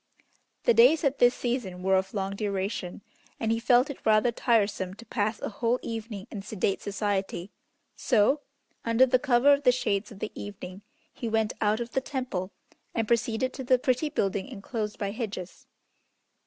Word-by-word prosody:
The 475 - +5
days 460 -11 +6
at 275 -1 +1
this 245 0 +5
season 225 -8 -3
were 190 0 +3
of 190 +2 -1
long 195 0 -2
duration, 200 -2 -3 0.4
and 225 -1 0
he 225 - +1
felt 245 +2 +4
it 280 - -11
rather 215 +2 +4
tiresome 205 -6 +1
to 235 - -13
pass 215 -1 -1
a - - -3
whole 230 +3 0
evening 225 -3 -5
in 205 - -5
sedate 195 -1 -1
society, 200 -2 -2 0.4
so, 250 +4 +3 0.4
under 230 +2 +4
the 255 0 +3
cover 270 +1 +5
of 280 - +1
the 255 -3 +5
shades 210 -4 -1
of 210 - -11
the 215 - -4
evening, 195 -2 -8 0.3
he 235 - -4
went 220 -1 +1
out 215 +1 +2
of 235 0 -4
the 265 - 0
Temple, 250 -10 -4 0.4
and 225 -2 0
proceeded 235 +2 0
to 265 - -6
the 255 0 +4
pretty 255 +4 0
building 195 -7 -1
enclosed 215 -3 -5
by 200 -1 -2
hedges. 205 -5 -6
220 Hz, 175 wpm, -28 LUFS, 200-250 Hz, 0.4 s, days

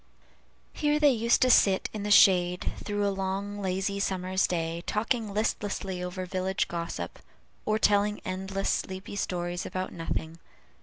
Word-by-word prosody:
Here 295 0 +1
they 295 -2 +6
used 235 0 +3
to 255 - +5
sit 195 -4 +4
in 215 - -4
the 205 - -3
shade 180 -3 +5
through 205 -1 -1
a 200 - 0
long, 195 +2 -3
lazy 195 +1 -1
summer's 190 -1 0
day, 165 -1 -2
talking 220 0 -1
listlessly 200 -3 -2
over 180 +1 -4
village 185 +1 -1
gossip, 170 -1 -5 0.5
or 215 0 +2
telling 210 0 +2
endless, 190 +1 -2
sleepy 190 +1 -4
stories 175 -2 -2
about 185 0 -4
nothing. 165 0 -4
190 Hz, 145 wpm, -28 LUFS, 180-205 Hz, 0.5 s, they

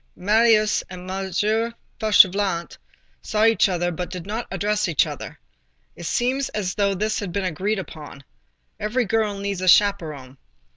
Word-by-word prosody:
Marius 215 +2 +3
and 180 -1 -9
M. 190 0 -3 0.7
Fauchelevent 195 -4 +3 0.4
saw 215 +1 +1
each 225 -2 +4
other, 175 -1 -1
but 175 +1 -5
did 180 -2 -7
not 220 +4 -4
address 210 0 -1
each 165 -4 +2
other. - - -8 0.6
It 170 - -7
seemed 260 +3 0
as 190 -4 -2
though 200 -1 +1
this 215 +3 -1
had 200 -4 -5
been 195 +2 -2
agreed 190 +5 -1
upon. 150 -6 -9 0.6
Every 235 +4 0
girl 215 -1 0
needs 200 -2 -3
a 185 - -2
chaperon. 155 -10 +2
200 Hz, 150 wpm, -23 LUFS, 180-215 Hz, 0.7 s, each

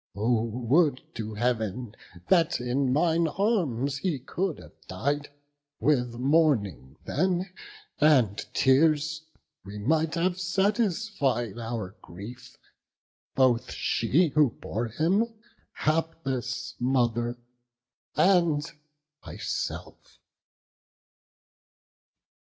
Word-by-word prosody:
oh 110 +2 +1
would 125 +6 +2
to 110 -1 -5
Heav'n 115 -1 -1 0.3
that 170 -3 +3
in 125 +2 0
mine 165 +3 +2
arms 145 - 0
He 175 -6 -1
could 170 +6 -3
have - - -14
died; 145 +1 -2 0.5
with 125 -5 +1
mourning 125 - +1
then 180 +3 0 0.5
and 130 -10 +4 0.2
tears 155 +3 +3 0.4
We 100 +2 -9
might 155 - +1
have 175 +2 0
satisfied 185 - 0
our 115 -4 -5
grief, 120 +7 -11 0.8
both 130 -2 +2
she 155 +9 +1
Who 145 -1 +4
bore 115 +4 -3
him, 190 - 0 0.4
hapless 135 -6 -2
mother, 120 -2 +1 0.8
and 165 -3 +3 0.6
myself." - - -5
135 Hz, 85 wpm, -27 LUFS, 120-165 Hz, 0.8 s, and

